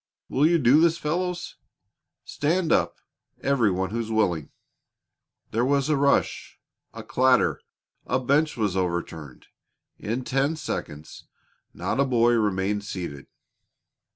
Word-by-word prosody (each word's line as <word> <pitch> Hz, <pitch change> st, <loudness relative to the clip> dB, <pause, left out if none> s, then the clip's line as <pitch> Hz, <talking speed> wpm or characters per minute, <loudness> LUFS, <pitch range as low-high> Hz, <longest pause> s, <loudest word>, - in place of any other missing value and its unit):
Will 145 Hz, +4 st, +3 dB
you 170 Hz, +1 st, +4 dB
do 140 Hz, +1 st, +5 dB
this, 170 Hz, 0 st, +3 dB
fellows? 175 Hz, +3 st, -3 dB, 0.7 s
Stand 165 Hz, +3 st, 0 dB
up, -, -, +2 dB, 0.5 s
every 135 Hz, -6 st, +2 dB
one 95 Hz, 0 st, -2 dB
who's 115 Hz, 0 st, -3 dB
willing." 90 Hz, -9 st, 0 dB, 1.0 s
There 115 Hz, +2 st, +1 dB
was 140 Hz, +2 st, +1 dB
a 155 Hz, -, +3 dB
rush, 140 Hz, 0 st, 0 dB, 0.3 s
a -, -, -9 dB
clatter 130 Hz, 0 st, +2 dB, 0.5 s
a 130 Hz, -, +1 dB
bench 145 Hz, +4 st, +1 dB
was 105 Hz, -5 st, 0 dB
overturned 85 Hz, -6 st, -4 dB, 0.5 s
in 120 Hz, +5 st, -3 dB
ten 135 Hz, +5 st, 0 dB
seconds 80 Hz, -, -6 dB, 0.5 s
not -, -, -3 dB
a 140 Hz, -, +4 dB
boy 120 Hz, -2 st, +3 dB
remained 105 Hz, -2 st, 0 dB
seated. 85 Hz, -9 st, -6 dB
120 Hz, 125 wpm, -25 LUFS, 95-145 Hz, 1.0 s, do